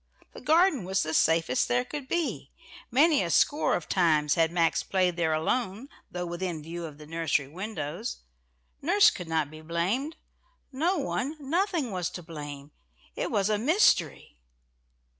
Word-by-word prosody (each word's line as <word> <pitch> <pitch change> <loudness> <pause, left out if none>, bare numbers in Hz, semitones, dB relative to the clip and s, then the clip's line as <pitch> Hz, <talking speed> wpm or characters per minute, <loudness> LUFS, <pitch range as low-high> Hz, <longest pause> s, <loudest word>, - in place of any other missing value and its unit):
The - - -10
garden 320 - +3
was 190 +2 0
the 155 - -3
safest 160 -5 +2
there 125 +1 +1
could 290 -3 -6
be, 345 +2 -2 0.4
many 295 +4 +4
a 175 - -2
score 290 - +3
of 175 - -4
times 155 -5 +2
had 165 -1 +2
Max 170 -1 +2
played 185 -2 0
there 165 -2 0
alone, 205 - -1 0.2
though 180 0 -4
within 175 -2 -4
view 170 +2 -6
of 150 -3 -9
the 150 - -12
nursery 160 -3 -1
windows; 185 - -5 0.6
nurse 375 +8 +5
could 180 - -7
not 160 -2 -1
be 155 0 -11
blamed. 190 - -2 0.6
No 330 +8 0
one, 280 0 -2
nothing, 325 - -1
was 180 -3 -2
to 175 - -10
blame. 145 -3 -8 0.4
It - - -2
was 205 -3 +1
a 210 -1 +1
mystery! 220 - +2
180 Hz, 160 wpm, -28 LUFS, 160-265 Hz, 0.6 s, nurse